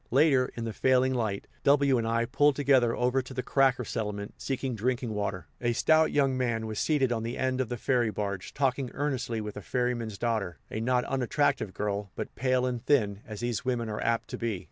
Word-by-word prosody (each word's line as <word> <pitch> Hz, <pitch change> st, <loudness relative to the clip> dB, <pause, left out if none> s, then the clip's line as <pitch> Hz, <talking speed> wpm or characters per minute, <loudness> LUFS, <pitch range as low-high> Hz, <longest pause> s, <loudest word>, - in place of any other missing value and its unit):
Later, 135 Hz, -1 st, +4 dB
in 115 Hz, -, -4 dB
the 115 Hz, -1 st, -3 dB
failing 130 Hz, +2 st, +3 dB
light, 110 Hz, -5 st, -2 dB, 0.2 s
W 140 Hz, -2 st, +4 dB
and 115 Hz, -, -1 dB
I 115 Hz, +1 st, +1 dB
pulled 145 Hz, +4 st, +3 dB
together 130 Hz, -4 st, +3 dB
over 125 Hz, +2 st, +1 dB
to 130 Hz, +1 st, -10 dB
the 125 Hz, -, -2 dB
"cracker" 130 Hz, -2 st, +2 dB
settlement, 105 Hz, -2 st, -4 dB
seeking 135 Hz, -1 st, -2 dB
drinking 120 Hz, +1 st, -1 dB
water. 100 Hz, -4 st, -3 dB, 0.2 s
A 120 Hz, -1 st, +1 dB
stout 155 Hz, +6 st, +4 dB
young 135 Hz, -2 st, +2 dB
man 120 Hz, -3 st, -1 dB
was 110 Hz, -1 st, -4 dB
seated 140 Hz, -5 st, +2 dB
on 115 Hz, -2 st, 0 dB
the 115 Hz, +2 st, -4 dB
end 130 Hz, 0 st, 0 dB
of 125 Hz, -, -3 dB
the 120 Hz, -, -3 dB
ferry 120 Hz, -1 st, +1 dB
barge, 100 Hz, -3 st, -4 dB
talking 135 Hz, -1 st, 0 dB
earnestly 130 Hz, -5 st, -1 dB
with 105 Hz, -1 st, -5 dB
the 105 Hz, -, -7 dB
ferryman's 120 Hz, -2 st, -2 dB
daughter, 105 Hz, -, -1 dB
a 110 Hz, -, -3 dB
not 125 Hz, +1 st, +2 dB
unattractive 135 Hz, -4 st, 0 dB
girl, 100 Hz, -1 st, -2 dB
but -, -, -5 dB
pale 130 Hz, 0 st, +1 dB
and 125 Hz, -2 st, -2 dB
thin, 105 Hz, -9 st, +2 dB
as 110 Hz, -1 st, -7 dB
these 120 Hz, -2 st, -2 dB
women 120 Hz, -3 st, -1 dB
are 105 Hz, -, -4 dB
apt 115 Hz, -1 st, 0 dB
to -, -, -5 dB
be. 115 Hz, -5 st, -2 dB
120 Hz, 210 wpm, -28 LUFS, 110-130 Hz, 0.2 s, Later